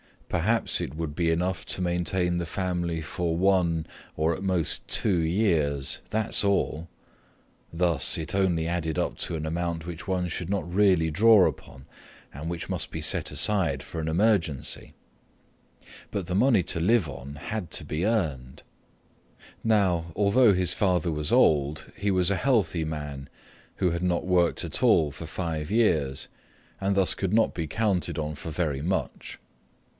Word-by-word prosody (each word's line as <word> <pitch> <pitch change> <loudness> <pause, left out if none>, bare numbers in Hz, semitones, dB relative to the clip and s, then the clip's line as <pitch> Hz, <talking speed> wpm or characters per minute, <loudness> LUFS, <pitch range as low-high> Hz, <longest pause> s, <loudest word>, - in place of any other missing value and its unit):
Perhaps 105 +6 0
it 65 - -5
would 80 -2 -4
be 85 +2 0
enough 85 +1 -1
to - - -2
maintain 90 0 0
the 85 - -2
family 85 -2 -2
for 80 +2 -2
one 90 -4 +2 0.3
or 80 +2 +1
at 85 - -6
most 90 -5 0
two 95 -4 +2
years, 80 -6 +1
that's 110 0 +3
all. 90 -5 0 0.8
Thus, 85 -6 +1
it 80 - -4
only 90 -4 +1
added 80 -2 -2
up - - -1
to 85 - -2
an 80 -1 -4
amount 85 0 -3
which 85 -2 -8
one 90 -2 -1
should 85 +1 -5
not 100 -3 -2
really 90 -5 +3
draw 105 +3 +6
upon 70 -3 -8 0.5
and 75 +4 -6
which 85 +1 -5
must 85 -5 -1
be 80 - -5
set 75 - +2
aside 100 -5 +1
for 80 - -7
an 80 - -3
emergency. 85 -4 +1 1.2
But 100 -4 -3
the 90 - -3
money 110 -1 +3
to 85 - -1
live 100 +1 +2
on 65 +2 -9
had 90 +4 -5
to - - 0
be 80 +4 -3
earned. 75 - -2 1.0
Now, 90 -7 +1
although 105 +2 +4
his 90 -2 +2
father 90 -4 +1
was 75 -1 -1
old, 75 0 +2
he 100 - -2
was 90 -1 +2
a 100 - +1
healthy 100 -11 +1
man 75 -3 -6 0.5
who 90 - 0
had 85 +1 -3
not 90 -1 0
worked 90 -2 +2
at - - 0
all 75 -2 +4
for 80 - -9
five 80 -2 -4
years 85 - +1 0.5
and 100 0 0
thus 95 -2 +3
could 95 0 -3
not 115 0 +3
be 80 -2 -4
counted 95 +1 -1
on 75 -1 -3
for 75 - -8
very 75 -4 -2
much. 95 +5 -3
85 Hz, 165 wpm, -26 LUFS, 80-95 Hz, 1.2 s, draw